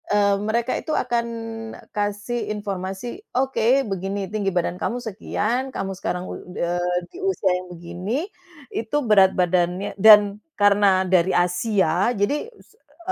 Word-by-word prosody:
Eee, 205 -1 +3
mereka 230 +3 0
itu 315 - -4
akan 235 -1 0 0.7
kasih 205 +3 -2
informasi, 200 - -5 0.2
"Oke, 265 0 +2
begini, 195 0 -3
tinggi 205 -2 0
badan 180 -1 -1
kamu 240 - -1
sekian, 235 +3 -2
kamu 195 -6 -4
sekarang 180 -1 -4
ud - - -7 0.2
eee, 175 +1 0 0.2
di - - -10
usia 380 - +1
yang 185 - -12
begini, 175 - -4 0.5
itu 225 +6 -2
berat 195 -4 +6
badannya" 180 +2 +1
dan 210 -1 +8 0.2
karena 200 -2 +4
dari 185 0 +3
Asia, 180 +1 +2
jadi 285 - 0
es 460 - -22
e 350 +2 -8
205 Hz, 135 wpm, -23 LUFS, 185-230 Hz, 0.7 s, dan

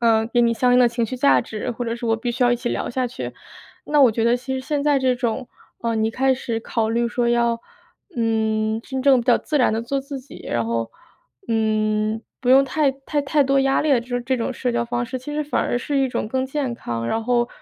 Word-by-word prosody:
呃， 225 -1 +3
给 240 +1 +2
你 235 0 +3
相 245 +2 +2
应 250 - +5
的 250 - +6
情 235 0 -1
绪 255 - -5
价 280 +3 +4
值， 220 +2 -5
或 245 +1 -4
者 230 0 -2
是 240 - -7
我 225 - +2
必 240 +1 -3
须 250 +2 -1
要 245 - +4
一 240 - +1
起 240 0 -3
聊 - - -2
下 255 +1 -1
去。 245 - -6 0.5
那 295 -1 +2
我 260 -4 +7
觉 225 - -1
得 235 +1 +4
其 260 +2 -6
实 260 - -2
现 285 +2 -2
在 290 -2 +3
这 260 -1 +2
种， 245 0 -2 0.3
呃， 230 -1 -1
你 220 0 +1
开 265 +3 +2
始 235 -3 -3
考 225 -1 -1
虑 235 +1 +1
说 240 0 0
要， 235 -1 +1 0.6
嗯， 220 -1 0
真 265 +1 -4
正 265 -2 +5
地 240 0 +4
自 300 - -2
然 250 - +3
地 225 - 0
做 275 +4 -2
自 275 0 -7
己， 260 - -13
然 115 - 0
后， 115 0 -2 0.6
嗯， 215 -1 0 0.2
不 245 - -3
用 270 +1 +7
太 280 +1 +1
太 275 +2 -3
太 285 +1 +2
多 275 +1 +2
压 270 0 +2
力 305 - 0
的 260 -4 +4
这 235 - -14
种 245 0 -1
这 260 -1 +1
种 235 - -2
社 250 0 -2
交 235 0 0
方 240 +1 -2
式， 255 +1 -4
其 275 +4 -7
实 300 - 0
反 295 - 0
而 245 - 0
是 280 +3 -1
一 270 -1 +2
种 230 - -3
更 260 +3 -1
健 265 -2 -2
康， 115 - -4
然 225 - -1
后， 240 -1 +1
245 Hz, 280 characters per minute, -22 LUFS, 230-265 Hz, 0.6 s, 我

